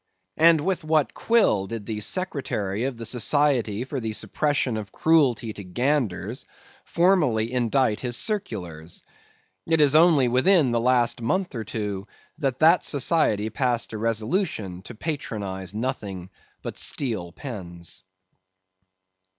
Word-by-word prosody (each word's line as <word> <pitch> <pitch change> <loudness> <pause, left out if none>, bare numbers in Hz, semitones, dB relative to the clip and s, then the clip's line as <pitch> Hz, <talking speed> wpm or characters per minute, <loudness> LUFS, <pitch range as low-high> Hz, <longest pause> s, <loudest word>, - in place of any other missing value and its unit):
And 165 -1 +6
with 185 0 -1
what 155 -2 +1
quill 205 - +2
did 115 -2 -6
the 110 -2 -4
Secretary 115 - -2
of 135 -3 -3
the 115 - -6
Society 125 -3 +1
for 135 +1 -4
the 110 -2 -3
Suppression 145 0 0
of 105 -3 -6
Cruelty 130 -9 +2
to 100 - -8
Ganders 120 +1 -1 0.4
formally 150 - +2
indite 120 -2 +1
his 120 -2 -1
circulars? 90 - -3 0.6
It 160 -1 +2
is 145 -2 +5
only 155 -5 +5
within 130 +3 +3
the 120 - +1
last 120 -1 +2
month 180 +9 -1
or 115 -3 -4
two 105 -2 -4 0.3
that 135 -3 -2
that 165 +3 +6
society 125 -7 +2
passed 120 -1 -1
a 110 - -4
resolution 110 - -1
to 125 - -9
patronize 105 - -5
nothing 100 -7 -4 0.3
but - - -5
steel 110 -11 -2
pens. 85 - -7
120 Hz, 130 wpm, -24 LUFS, 105-150 Hz, 0.6 s, And